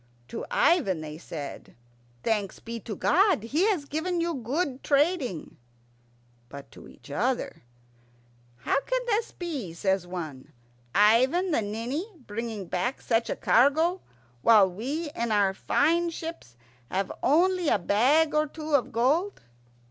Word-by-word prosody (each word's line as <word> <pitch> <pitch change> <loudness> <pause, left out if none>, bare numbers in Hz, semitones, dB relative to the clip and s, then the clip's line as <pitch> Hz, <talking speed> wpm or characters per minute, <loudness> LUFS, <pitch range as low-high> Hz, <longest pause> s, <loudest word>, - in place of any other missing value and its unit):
To - - -5
Ivan 255 - +2
they 155 0 -8
said, 150 -5 -8 0.5
"Thanks 210 -3 -1
be 230 0 -6
to 215 -1 -6
God, 370 - +3
He 300 - +1
has 350 -9 0
given 340 +5 -2
you 335 0 0
good 270 +2 -2
trading." 285 - 0 0.9
But 140 0 -11
to - - -13
each - - -15
other, 240 - -1 1.0
"How 275 - +2
can - - -2
this 460 -1 0
be?" 285 - -5
says 190 +1 0
one. 160 -7 -7 0.4
"Ivan 255 - +4
the 290 - +2
Ninny 240 - -4
bringing 220 -1 -5
back 210 +10 -2
such 230 -1 0
a - - -1
cargo, 320 +9 +3 0.4
while 210 - +6
we 275 - -4
in 235 -1 -2
our 200 -2 +3
fine 340 - +1
ships 325 - -8 0.3
have 195 +1 -2
only 360 +3 +3
a - - +4
bag 260 - +3
or 305 0 +2
two 310 +1 -7
of 280 -4 +2
gold." 295 - +1
255 Hz, 140 wpm, -27 LUFS, 205-330 Hz, 1.0 s, while